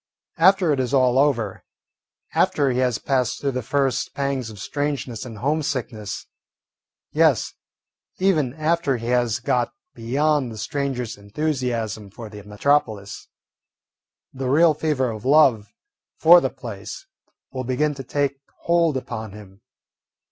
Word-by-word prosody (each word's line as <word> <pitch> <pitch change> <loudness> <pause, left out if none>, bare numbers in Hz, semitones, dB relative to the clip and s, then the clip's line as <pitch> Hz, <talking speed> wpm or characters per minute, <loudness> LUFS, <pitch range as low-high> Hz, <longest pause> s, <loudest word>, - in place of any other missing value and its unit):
After 185 -2 +5
it 140 - -1
is 130 +1 0
all 130 -1 +4
over, 120 -9 +1 0.7
after 140 -2 +2
he 125 - -1
has 125 -3 +1
passed 130 -4 0
through 140 - -1
the 130 0 -3
first 135 +1 -1
pangs 140 -4 -2
of 110 - -10
strangeness 135 0 -3
and 115 -3 -8
homesickness, 130 -6 -2 0.9
yes, - - +2 0.6
even 155 -9 +1
after 155 -3 +1
he 115 +1 -5
has 120 -3 +1
got 120 -1 0 0.2
beyond 135 +3 0
the 110 - -8
stranger's 130 0 -3
enthusiasm 115 -2 -3
for 110 +2 -9
the 105 -1 -10
metropolis, 105 -2 -1 1.1
the 130 -1 -3
real 160 +4 +5
fever 145 -5 0
of 110 -1 -8
love 130 -7 +4 0.5
for - - +8
the - - 0
place 385 - -8 0.5
will 130 -1 -4
begin 130 +4 0
to 135 -1 -8
take 140 +1 -1 0.2
hold 170 -4 +2
upon 110 -5 -6
him. 100 -1 -13
130 Hz, 135 wpm, -23 LUFS, 115-145 Hz, 1.1 s, for